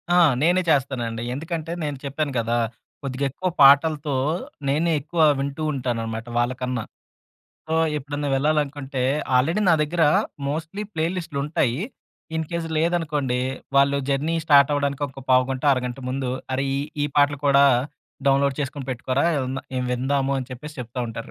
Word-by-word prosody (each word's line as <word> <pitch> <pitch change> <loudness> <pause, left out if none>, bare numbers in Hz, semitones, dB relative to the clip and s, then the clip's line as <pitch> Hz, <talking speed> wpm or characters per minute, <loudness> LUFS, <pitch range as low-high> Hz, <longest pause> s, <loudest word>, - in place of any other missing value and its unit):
ఆ! - - +5 0.2
నేనే 175 +3 +4
చేస్తానండి. 125 -6 0
ఎందుకంటే, 165 +3 -4
నేను 145 -2 -3
చెప్పాను 140 +1 -2
కదా! 115 +1 0 0.5
కొద్దిగా 135 +1 -2
ఎక్కువ 185 +7 -2
పాటలతో 145 +1 +5 0.5
నేనే 160 +5 +2
ఎక్కువ 160 +3 -2 0.2
వింటూ 140 +3 -3
ఉంటాననమాట 115 -3 -3
వాళ్ళకన్నా. 125 0 -1 0.8
సో, 160 - -1 0.2
ఎప్పుడన్నా 145 +1 -4
వెళ్ళాలనుకుంటే, 145 -2 -1 0.3
ఆల్రెడీ 160 +11 +2
నా 165 - +6
దగ్గర 165 +2 0 0.5
మోస్ట్‌లీ 165 +7 -4
ప్లే 160 0 0
లిస్ట్‌లుంటాయి. 145 -5 -1 0.6
ఇన్‌కేస్ 165 +1 -3
లేదనుకోండి, 150 -6 0 0.4
వాళ్ళు 140 0 +4
జర్నీ 150 +5 0
స్టార్ట్ 145 -2 +6
అవ్వడానికి 140 0 -1
ఒక 135 0 -11
పావుగంటొ, 130 +2 +2
అరగంట 125 0 -2
ముందు 130 0 -2 0.2
"అరె! 135 - 0
ఈ - - 0 0.3
ఈ - - +1
పాటలు 145 0 +4
కూడా 140 0 +6 0.6
డౌన్‌లోడ్ 140 0 +2
చేసుకొని 140 -1 -4
పెట్టుకోరా 130 +4 -1 0.5
ఇవి 125 - -1
విందాము" 135 +2 0
అని 130 0 -5
చెప్పేసి 150 +4 -9
చెప్తా 120 +2 -9
ఉంటారు. 115 - -9
140 Hz, 135 wpm, -23 LUFS, 130-155 Hz, 0.8 s, నా